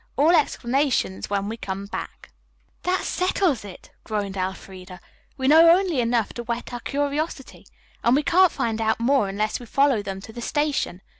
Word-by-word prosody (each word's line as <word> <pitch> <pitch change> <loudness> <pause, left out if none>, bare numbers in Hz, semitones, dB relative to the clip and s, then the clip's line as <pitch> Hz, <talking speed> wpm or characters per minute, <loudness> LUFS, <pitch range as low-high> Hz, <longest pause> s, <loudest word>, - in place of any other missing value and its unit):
All 300 +5 +5
explanations 260 - +1
when 200 0 -1
we 225 +2 -5
come 195 -2 -5
back.'" 200 - -8 0.5
"That 365 +1 0
settles 365 - 0
it," 195 -3 -12
groaned 205 -3 -3
Elfreda. 185 -1 -6 0.4
"We 260 - -1
know 325 +3 +7
only 350 -4 +3
enough 235 -2 0
to 240 - -6
whet 235 +1 -5
our 245 - -4
curiosity. 285 +2 -3 0.4
And 235 +2 +4
we 295 - +2
can't 360 +3 +4
find 225 -1 -2
out 220 0 +1
more 235 -3 +2
unless 210 +2 -2
we 245 - -11
follow 275 -3 +2
them 195 -1 -6
to 220 - -11
the 240 - -7
station. 290 - -1
240 Hz, 170 wpm, -23 LUFS, 205-290 Hz, 0.5 s, know